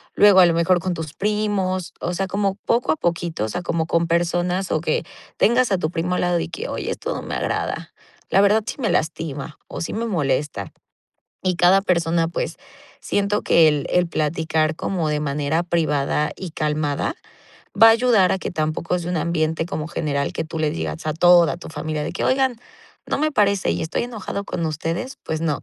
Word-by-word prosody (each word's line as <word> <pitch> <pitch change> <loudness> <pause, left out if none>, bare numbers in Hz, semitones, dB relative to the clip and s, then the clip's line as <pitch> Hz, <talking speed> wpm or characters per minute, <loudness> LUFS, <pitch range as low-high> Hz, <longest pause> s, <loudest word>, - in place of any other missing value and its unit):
luego, 205 -2 +7
a - - +8
lo 170 - +2
mejor, 170 +2 +3
con 185 +1 -2
tus 160 -3 -6
primos. 200 -3 -1
O 175 - -2
sea, 195 - 0
como 195 0 0
poco 240 +2 +2
a - - +2
poquito, 170 - -1
o 110 - -4
sea, 180 - -3
como 165 -2 -1
con 170 0 +1
personas 175 +2 0
o 155 - +1
que 160 0 0 0.3
tengas 240 0 +3
a 195 - +3
tu 155 -2 -2
primo 180 +1 -1
al - - 0
lado 175 -1 +1
y - - -4
que: 465 - -5
"Oye, - - -4
esto - - -4
no - - -4
me - - -4
agrada. - - -3 0.4
La 195 - +4
verdad, 210 +2 +4
sí - - -3
me 235 - 0
lastima 155 -2 -2
o - - -7
sí - - -3
me 230 +2 -2
molesta". 140 - -1 0.7
Y 185 -1 +1
cada 180 +3 +5
persona, 170 -3 +1
pues, 170 - -3 0.4
siento 205 +1 0
que 165 -1 +5
el 150 -2 +1
el 180 -1 +3
platicar 155 0 0
como 170 -1 -2
de 150 - 0
manera 145 +3 0
privada 150 -3 0
y 185 -3 -6
calmada 150 -2 -1 0.7
va 225 - +10
a - - +9
ayudar 225 -5 +4
a - - 0
que - - -4
tampoco 155 +2 -1
sea 175 +1 -4
un 180 - -1
ambiente 160 0 0
como 155 -3 -4
general 140 -4 -2
que - - -2
tú 160 +1 -6
le 155 -1 +1
digas 80 - -4
a 155 - 0
toda 175 0 +5
tu 175 - -10
familia 155 0 -3
de - - -4
que: - - -4
"Oigan, 260 -2 +2 0.5
no - - -1
me 305 +1 +1
parece 200 -5 +2
y - - -3
estoy 160 +8 -2
enojado 215 -4 -5
con 170 -3 -3
ustedes", 165 - -3
pues 160 0 -3
no. 155 -4 -1
170 Hz, 210 wpm, -22 LUFS, 155-195 Hz, 0.7 s, va